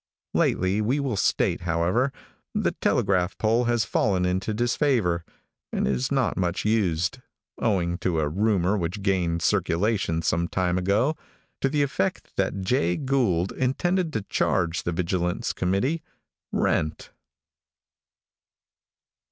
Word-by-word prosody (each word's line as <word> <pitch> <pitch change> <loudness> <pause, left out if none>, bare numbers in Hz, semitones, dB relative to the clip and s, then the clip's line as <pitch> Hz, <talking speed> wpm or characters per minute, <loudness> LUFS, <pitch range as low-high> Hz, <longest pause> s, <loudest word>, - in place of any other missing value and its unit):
Lately, 95 +3 +2
we 125 +7 +1
will 135 -5 -1
state, 95 - +1
however, 90 +10 +1 0.4
the - - +1
telegraph 95 -2 +1
pole 115 +3 +2
has 120 -2 +1
fallen 95 -6 +1
into 95 +4 -1
disfavor, 120 - +1 0.5
and - - 0
is 65 -1 0
not - - +1
much 90 0 -1
used, 100 0 +1 0.4
owing 90 -6 0
to 85 -3 0
a 75 - +1
rumor 100 +2 +1
which 90 +4 -3
gained 85 -4 +1
circulation 95 -2 +1
some 85 +2 +1
time 90 0 0
ago, 105 - +2 0.4
to 135 - +1
the 145 +1 +2
effect 185 +7 -2
that 95 0 -1
Jay 95 -4 +1
Gould 120 - +1
intended 170 +7 0
to 110 - -2
charge 90 -4 0
the 85 - -2
vigilance 90 +1 -1
committee 110 - 0 0.5
rent. 75 0 0
95 Hz, 125 wpm, -25 LUFS, 85-120 Hz, 0.5 s, Lately